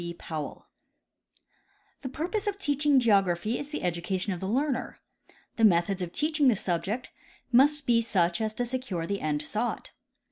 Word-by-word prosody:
B. 170 0 -5
POWELL 155 -3 -6 1.4
The 260 - -5
purpose 355 - -3
of 405 -1 -1
teaching 290 -5 +3
geography 200 -2 +2
is 290 - -6
the 300 - -5
education 180 +3 -1
of 175 - -6
the 190 - -4
learner. 260 +4 -1 0.6
The 225 - 0
methods 185 -1 +3
of 175 -1 -3
teaching 300 - +1
tlie 235 -5 +4
subject 195 +7 -2 0.4
must 285 +4 +4
be 235 -1 +4
such 180 -5 +1
as 215 0 -2
to 245 - -1
secure 240 -9 -3
the 200 +3 -3
end 150 -1 -1
sought. 215 +9 -3
220 Hz, 165 wpm, -28 LUFS, 180-270 Hz, 1.4 s, tlie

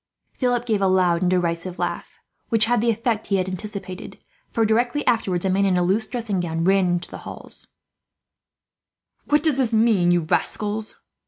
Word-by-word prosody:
Philip 245 -2 0
gave 215 -4 0
a 195 - +3
loud 180 -2 +2
and 180 - +2
derisive 175 0 -1
laugh, 175 -1 -4 0.3
which 225 -2 +3
had 240 -1 +2
the 235 - +2
effect 230 -1 -1
he 200 - +1
had 185 -1 0
anticipated 195 0 -6 0.3
for, 225 -2 +1
directly 240 +6 +1
afterwards, 195 -7 +1
a - - +2
man 195 +2 +2
in 190 -2 +2
a 180 - +2
loose 200 +5 +1
dressing 225 -6 -3
gown 165 -1 -2
ran 190 +1 +3
into 175 0 -2
the - - -7
hall. - - -10 1.7
"What 295 +1 +2
does 310 -5 +2
this 240 -4 +1
mean, 215 -6 +3
you 175 0 +3
rascals?" 210 +6 -1
200 Hz, 180 wpm, -23 LUFS, 180-230 Hz, 1.7 s, a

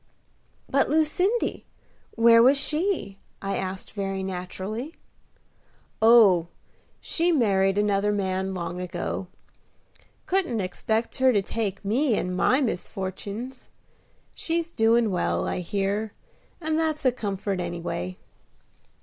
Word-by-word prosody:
"But 275 +1 +2
Lucindy, 340 - +1 0.5
where 230 0 +6
was 265 +4 +6
she?" 305 - -1 0.2
I 195 0 -3
asked 190 0 -4
very 195 -2 -3
naturally. 190 - -5 1.1
"Oh! 215 -7 +6 0.5
she 340 +1 +1
married 195 - +2
another 205 0 +2
man 190 -1 -1
long 175 0 -4
ago. 180 +1 -4 1.0
Couldn't 355 - 0
expect 220 +6 -2
her 260 0 +5
to 205 -4 +2
take 200 -2 -3
me 240 +4 +2
and 180 0 -2
my 260 +9 +3
misfortins. 205 +3 -4 0.6
She's 335 0 -2
doin' 225 -3 +3
well, 180 - 0
I - - -2
hear, 200 +3 -2 0.5
and 315 -1 -1
that's 315 -3 -1
a 255 - +5
comfort 200 -4 -3
anyway." 170 - -4
210 Hz, 110 wpm, -25 LUFS, 190-260 Hz, 1.1 s, where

